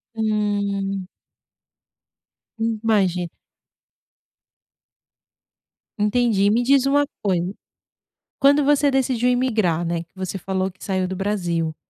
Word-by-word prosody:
Hum. 200 -3 -1 1.5
Hum, 225 -1 -1
imagina 185 -6 +1 2.7
Entendi. 210 -1 +2
Me 230 +3 +2
diz 270 +2 +3
uma 285 +1 +3 0.2
coisa, 185 -1 0 0.9
quando 285 +1 +5
você 290 0 +3
decidiu 255 -2 +1
imigrar, 220 -10 +1
né, 170 0 -1
que 170 - -32
você 190 0 -4
falou 190 0 -2
que 185 - -17
saiu 190 -2 -1
do 190 - -4
Brasil, 175 -5 -1
205 Hz, 100 wpm, -22 LUFS, 185-245 Hz, 2.7 s, quando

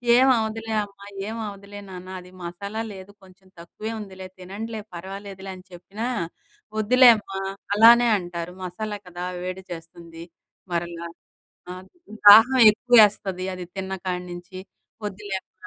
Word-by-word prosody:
"ఏమవ్వదులే 225 -3 +2
అమ్మా, 200 0 -13 0.2
ఏమి 225 +1 -5
అవ్వదులే 200 0 -9
నాన్న 185 0 -9
అది 180 0 -14
మసాలా 200 +6 -5
లేదు 190 +1 -11
కొంచెం 190 0 -20
తక్కువే 210 +6 -7
ఉందిలే, 190 -2 -9
తినండిలే 210 +4 -6
పర్వాలేదులే" 195 +1 -8
అని 185 - -14
చెప్పినా! 200 +6 -6 0.7
వద్దులే 250 +3 +7
అమ్మా 195 -2 -6 0.4
అలానే 235 +3 +7
అంటారు 175 -1 -6
మసాలా 205 +3 -5
కదా 175 0 -7 0.2
వేడి 185 +1 -5
చేస్తుంది. 165 0 -10 0.5
మరలా 170 0 -3 0.7
ఆహ్, 185 +1 -10 0.4
దాహం 225 +6 +9
ఎక్కువ 245 +3 +1
వేస్తది 190 -3 +1
అది 180 - -6
తిన్న 190 0 -4
కాడనుంచి 180 +1 -5 0.5
వద్దులే 205 -1 -5
అమ్మ - - -73
195 Hz, 125 wpm, -24 LUFS, 180-215 Hz, 0.7 s, దాహం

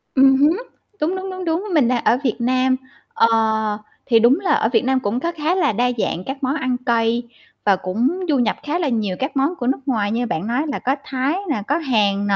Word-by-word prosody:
Ừm 270 0 +6
hứm, 310 +9 +3 0.4
đúng, 330 +5 0
đúng, 380 +1 -5
đúng, 370 -1 -6
đúng, 330 +3 0
mình 280 -7 +4
đang 245 -2 0
ở 235 - +3
Việt 245 - +1
Nam, 255 +2 +2 0.4
ờ, 230 - +4 0.8
thì 230 -3 +4
đúng 245 +9 +4
là 390 - -1
ở 220 - +2
Việt 240 +1 +1
Nam 265 0 +2
cũng 215 +2 -2
có 340 +5 -2
khá 315 +3 0
là 370 - +2
đa 245 +3 +1
dạng 185 -4 -2
các 270 +1 -6
món 265 +3 0
ăn 255 -5 -1
cay 235 0 +1 0.4
và 200 - +5
cũng 235 - -1
du 285 - +3
nhập 235 -3 +1
khá 310 +4 -2
là 320 - 0
nhiều 215 -6 -1
các 270 +1 -3
món 280 +7 +1
của 250 -7 -4
nước 270 - +1
ngoài 215 -6 0
như 240 +2 0
bạn 190 -3 -3
nói 245 +5 0
là 285 - -3
có 265 +2 0
Thái 270 +4 -1
nè, 225 -8 -1
có 290 - +1
Hàn 210 -9 +1
nè, 200 - +2
255 Hz, 245 wpm, -20 LUFS, 230-295 Hz, 0.8 s, Ừm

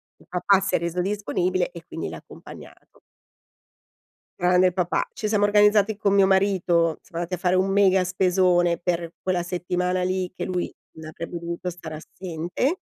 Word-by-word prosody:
Il - - -23
papà 190 +2 +3
si 195 - 0
è - - +4
reso 170 +1 -2
disponibile 185 -2 -1
e 170 -2 -10
quindi 165 - -5
l'ha - - -6
accompagnato. - - -14 1.4
Grande 180 +1 +4
il 180 - -1
papà. 180 -1 0
Ci 215 - -3
siamo 210 -1 +2
organizzati 210 0 +4
con 200 -2 +1
mio 195 -1 +5
marito, 185 -4 +2
siamo 170 0 -5
andati 175 +2 -7
a 180 - 0
fare 180 0 +1
un 190 +1 +2
mega 195 -1 +4
spesone 180 -1 +2
per 170 -1 -3
quella 185 -1 -1
settimana 180 +1 -1
lì, 185 0 -1
che - - -5
lui 180 -1 -2 0.3
non 160 0 -9
avrebbe 170 +2 -6
dovuto 170 +1 -4
stare 165 -2 -8
assente 175 - -3
180 Hz, 170 wpm, -24 LUFS, 175-190 Hz, 1.4 s, mio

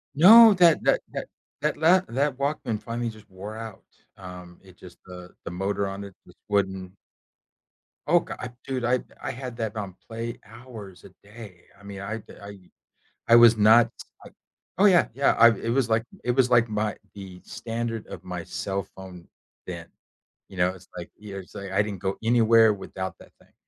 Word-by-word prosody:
No, 220 +8 +9
that 170 -3 +4
that - - +3
that - - -5 0.3
that - - -1
la 175 +4 +5
that 135 +2 -1
Walkman 140 -6 -2
finally 115 +1 -4
just 110 -1 -14
wore 100 +3 -9
out. 110 -3 -9 0.3
Um, 90 -2 -11
it 95 -2 -18
just 90 -1 -14
the 90 -1 -11 0.2
the - - -5
motor 100 +2 -2
on 95 +1 -6
it 100 - -10
just - - -18
wouldn't 95 -2 -1 1.2
Oh, 175 +3 +5
go - - -8
I 125 - -5 0.2
dude, 130 -2 -3
I 125 +1 +2 0.2
I - - -3
had 125 -1 -8
that 110 -2 -3
on 100 -4 -6
play 115 +2 -6
hours 110 -5 -12
a - - -13
day. 105 -4 -13 0.2
I 100 - -19
mean, 100 -1 -9
I 105 +3 -4
d 110 - -14
I 100 0 -10 0.7
I 115 - +8
was 120 -1 +7
not 110 +2 +5 0.3
I - - -12 0.5
Oh, 195 - +4
yeah, 180 -4 +5
yeah, 140 +2 +3
I 115 - +9
it 115 +2 -4
was 125 -1 +1
like 110 0 +2 0.2
it 125 - 0
was 125 0 +2
like 120 -1 +4
my 105 0 -2 0.2
the 95 -2 -10
standard 115 -1 -5
of - - -9
my - - -6
cell 100 -1 -4
phone 95 -2 -11 0.4
then, - - -7 0.6
you 95 - -13
know? 90 0 +2
It's 90 -1 -13
like 85 - -8
you 105 -1 -12
know - - -6
what - - -7
I'm - - -18
saying? 100 - -9
It's - - -8
like, 95 - 0
I - - +5
didn't 100 -3 -6
go 95 0 -2
anywhere 115 -1 +5
without 95 -1 -6
that - - -17
thing, - - -25
110 Hz, 205 wpm, -25 LUFS, 95-120 Hz, 1.2 s, No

